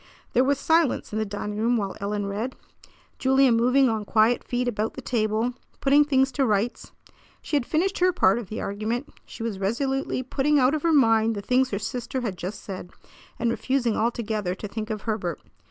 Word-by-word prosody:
There 250 Hz, -, +4 dB
was 280 Hz, +1 st, +2 dB
silence 320 Hz, -5 st, +1 dB
in 215 Hz, -, -1 dB
the 220 Hz, -, 0 dB
dining 205 Hz, +1 st, -4 dB
room 235 Hz, +2 st, +2 dB
while 200 Hz, -3 st, -3 dB
Ellen 205 Hz, 0 st, -2 dB
read, 215 Hz, +6 st, -3 dB, 0.6 s
Julia 265 Hz, 0 st, +4 dB
moving 250 Hz, +4 st, +4 dB
on 220 Hz, -2 st, -1 dB
quiet 220 Hz, +3 st, +2 dB
feet 245 Hz, 0 st, -2 dB
about 220 Hz, -2 st, -2 dB
the -, -, -6 dB
table, 225 Hz, +1 st, 0 dB, 0.3 s
putting 285 Hz, +2 st, +4 dB
things 270 Hz, -2 st, +2 dB
to 275 Hz, -, 0 dB
rights. 215 Hz, +3 st, -1 dB, 0.5 s
She -, -, -2 dB
had 275 Hz, -4 st, +1 dB
finished 375 Hz, +5 st, 0 dB
her 365 Hz, +1 st, +4 dB
part 195 Hz, -, +3 dB
of 215 Hz, -6 st, -8 dB
the 215 Hz, -, -4 dB
argument. 220 Hz, +7 st, -3 dB, 0.2 s
She 225 Hz, -, -8 dB
was 220 Hz, -4 st, -3 dB
resolutely 260 Hz, +6 st, -1 dB
putting 280 Hz, +3 st, +1 dB
out 260 Hz, +1 st, +4 dB
of 310 Hz, -, -1 dB
her 335 Hz, -, +2 dB
mind 225 Hz, -6 st, +4 dB
the 200 Hz, -, -4 dB
things 255 Hz, +3 st, +2 dB
her 200 Hz, -, -2 dB
sister 240 Hz, +5 st, -4 dB
had 215 Hz, -6 st, -3 dB
just 185 Hz, +4 st, -6 dB
said, 185 Hz, -3 st, -7 dB, 0.5 s
and 230 Hz, 0 st, 0 dB
refusing 245 Hz, -2 st, 0 dB
altogether 215 Hz, -5 st, -1 dB
to 210 Hz, -, -6 dB
think 215 Hz, +2 st, -5 dB
of 215 Hz, -1 st, -4 dB
Herbert. 195 Hz, -8 st, -2 dB
235 Hz, 200 wpm, -25 LUFS, 210-265 Hz, 0.6 s, There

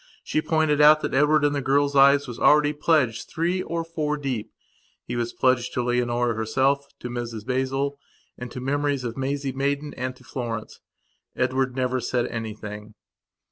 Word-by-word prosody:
She 155 Hz, -, 0 dB
pointed 155 Hz, -2 st, +2 dB
out 155 Hz, +1 st, +7 dB
that -, -, -3 dB
Edward 150 Hz, +2 st, +4 dB
in 145 Hz, -, +2 dB
the 140 Hz, -, -1 dB
girl's 140 Hz, +2 st, +1 dB
eyes, 140 Hz, +1 st, +6 dB
was 120 Hz, -1 st, -7 dB
already 150 Hz, 0 st, +5 dB
pledged 145 Hz, -7 st, +1 dB
three 175 Hz, +3 st, -1 dB
or 170 Hz, -1 st, -3 dB
four 155 Hz, -2 st, -2 dB
deep. 125 Hz, -7 st, -4 dB, 0.5 s
He 120 Hz, -, -4 dB
was 120 Hz, 0 st, -2 dB
pledged 130 Hz, -1 st, +1 dB
to 125 Hz, -, 0 dB
Leonora 120 Hz, 0 st, 0 dB
herself, 135 Hz, +6 st, 0 dB
to -, -, -4 dB
Mrs 120 Hz, -3 st, -5 dB
Basil, 135 Hz, +2 st, -1 dB, 0.4 s
and 125 Hz, 0 st, -7 dB
to 125 Hz, -, -7 dB
the 125 Hz, -, -7 dB
memories 145 Hz, -1 st, 0 dB
of 120 Hz, -1 st, -4 dB
Maisie 135 Hz, +1 st, -2 dB
Maidan 140 Hz, +2 st, -2 dB
and 130 Hz, 0 st, -4 dB
to 130 Hz, -, -19 dB
Florence. 120 Hz, -4 st, -5 dB, 0.6 s
Edward 130 Hz, -1 st, 0 dB
never 130 Hz, 0 st, 0 dB
said 120 Hz, 0 st, -1 dB
anything. 110 Hz, -1 st, -7 dB
130 Hz, 175 wpm, -24 LUFS, 120-145 Hz, 0.6 s, out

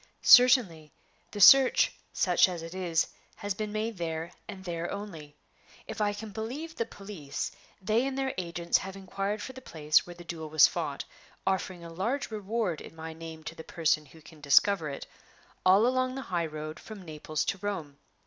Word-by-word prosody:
"Certainly; 230 Hz, -, +6 dB, 0.4 s
the 205 Hz, -, -7 dB
search, 270 Hz, +5 st, +7 dB, 0.2 s
such -, -, +3 dB
as 175 Hz, -2 st, -5 dB
it 165 Hz, +1 st, -8 dB
is, 175 Hz, -3 st, +1 dB, 0.3 s
has 205 Hz, 0 st, -3 dB
been 210 Hz, +1 st, -4 dB
made 215 Hz, 0 st, -3 dB
there, 165 Hz, 0 st, -3 dB, 0.2 s
and 195 Hz, -3 st, -8 dB
there 170 Hz, -1 st, -3 dB
only. 165 Hz, -8 st, -7 dB, 0.5 s
If -, -, -6 dB
I 205 Hz, -1 st, +2 dB
can 210 Hz, +1 st, -7 dB
believe 255 Hz, +11 st, -5 dB
the 230 Hz, -, -2 dB
police, 195 Hz, -11 st, -6 dB, 0.3 s
they 220 Hz, +6 st, +1 dB
and 270 Hz, 0 st, -4 dB
their 270 Hz, -1 st, -1 dB
agents 170 Hz, -1 st, 0 dB
have 190 Hz, 0 st, -7 dB
inquired 195 Hz, +2 st, -3 dB
for 260 Hz, -, -7 dB
the 260 Hz, -, -10 dB
place 155 Hz, -8 st, +1 dB
where 175 Hz, -, -9 dB
the 175 Hz, -, -11 dB
duel 165 Hz, -2 st, -6 dB
was 155 Hz, -1 st, +7 dB
fought -, -, -4 dB, 0.4 s
(offering 185 Hz, -2 st, -1 dB
a 165 Hz, 0 st, -9 dB
large 235 Hz, +10 st, -2 dB
reward 210 Hz, -4 st, -2 dB
in -, -, -11 dB
my 160 Hz, 0 st, -7 dB
name 160 Hz, -1 st, -9 dB
to 160 Hz, -, -6 dB
the 160 Hz, -, -10 dB
person 155 Hz, -3 st, 0 dB
who 160 Hz, +3 st, -17 dB
can 160 Hz, -1 st, -15 dB
discover 155 Hz, +4 st, +4 dB
it) 140 Hz, -, -6 dB, 0.6 s
all 195 Hz, +4 st, +6 dB
along 255 Hz, +1 st, +1 dB
the 270 Hz, -, -4 dB
high 170 Hz, -2 st, +1 dB
road 155 Hz, 0 st, -7 dB
from 210 Hz, -4 st, -10 dB
Naples 155 Hz, -1 st, -3 dB
to 195 Hz, 0 st, -2 dB
Rome. 180 Hz, -8 st, -4 dB
185 Hz, 185 wpm, -29 LUFS, 160-215 Hz, 0.6 s, search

